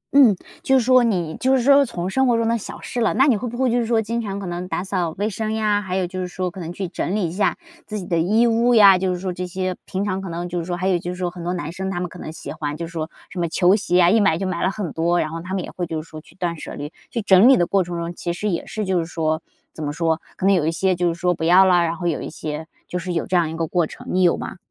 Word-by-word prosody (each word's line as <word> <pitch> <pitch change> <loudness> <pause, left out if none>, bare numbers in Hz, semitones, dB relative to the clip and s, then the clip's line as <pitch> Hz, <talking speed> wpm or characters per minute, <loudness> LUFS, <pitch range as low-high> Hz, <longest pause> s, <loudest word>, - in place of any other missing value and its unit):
嗯， 255 -8 +7 0.3
就 265 - +3
是 245 - +1
说 255 0 +6
你 175 -9 0
就 260 +1 +3
是 245 - 0
说 280 +2 +6
从 180 -6 -4
生 265 +7 +2
活 240 -2 +3
中 230 0 +1
的 230 - +2
小 230 - -6
事 245 - -4
了， 225 - +2
那 265 - +5
你 270 -5 +4
会 215 +4 -3
不 240 - -7
会 255 -2 +2
就 245 - +2
是 235 - -1
说 230 -1 +2
经 230 +2 -2
常 200 -3 -4
可 195 - -6
能 175 0 -4
打 180 - -2
扫 185 -3 -1
卫 205 +2 0
生 220 +1 -3
呀， 210 -2 +1
还 185 -2 -4
有 190 -1 +1
就 185 +1 -5
是 180 - -3
说 180 0 -3
可 185 - -10
能 170 -1 -5
去 190 +1 -4
整 180 +2 -3
理 205 -5 0
一 - - -5
下 195 +4 0 0.3
自 215 - -4
己 190 - -5
的 170 -2 0
衣 215 +8 +3
物 235 +1 +3
呀， 200 -4 +8
就 185 0 0
是 180 - -3
说 185 0 -3
这 180 +1 -4
些 185 +1 -3
平 195 +2 -3
常 190 -1 -2
可 190 - -6
能 170 +1 -4
就 175 0 -3
是 165 - -4
说 175 0 -3
还 185 - -1
有 180 -2 +2
就 175 - -6
是 180 - -4
说 180 -1 -2
很 175 -1 -9
多 175 - -2
男 160 -2 -4
生， 190 +2 -4
他 175 -2 -3
们 180 - -2
可 180 - -12
能 155 - -6
喜 160 - -7
欢 150 -1 -4
就 170 - -4
是 165 - -10
说 160 -2 -4 0.2
什 185 - -6
么 170 -1 0
球 180 +3 +4
鞋 180 -4 +1
呀， 175 -1 +5
一 225 - +4
买 195 -6 +3
就 190 - -3
买 185 -2 -2
了 185 - +2
很 195 -5 -4
多， 170 +2 +1
然 155 - -1
后 165 0 -5
他 185 +2 -4
们 185 - -2
也 - - -8
会 175 -1 -4
就 160 -1 -4
是 - - -19
说 155 -1 -10
去 - - -21
断 175 -3 -2
舍 - - -7
离， 145 +2 -7 0.2
去 230 - -3
整 195 +4 +6
理 270 - +7
的 175 - +3
过 195 +1 +2
程 175 0 -5
中， 170 +1 -4
其 170 0 -4
实 210 +4 -2
也 170 - -3
是 215 -1 -3
就 185 -2 +1
是 165 - -3
说 160 -2 -1 0.3
怎 155 - -7
么 145 - -2
说， 165 0 0 0.2
可 - - -2
能 200 - +5
有 165 -5 +2
一 - - +2
些 185 +3 +1
就 175 0 0
是 165 - -8
说 180 0 +2
不 165 - -6
要 180 +3 +6
了， 180 -2 +4
然 170 0 0
后 175 0 -6
有 165 -4 0
一 - - -5
些 155 0 -6 0.2
就 180 - -3
是 180 0 -4
有 165 - -1
这 185 - -2
样 170 -3 +3
一 160 - -6
个 165 - 0
过 170 0 0
程， - - -12
你 185 - +2
有 175 -2 +4
吗？ - - -6
180 Hz, 365 characters per minute, -22 LUFS, 170-205 Hz, 0.3 s, 呀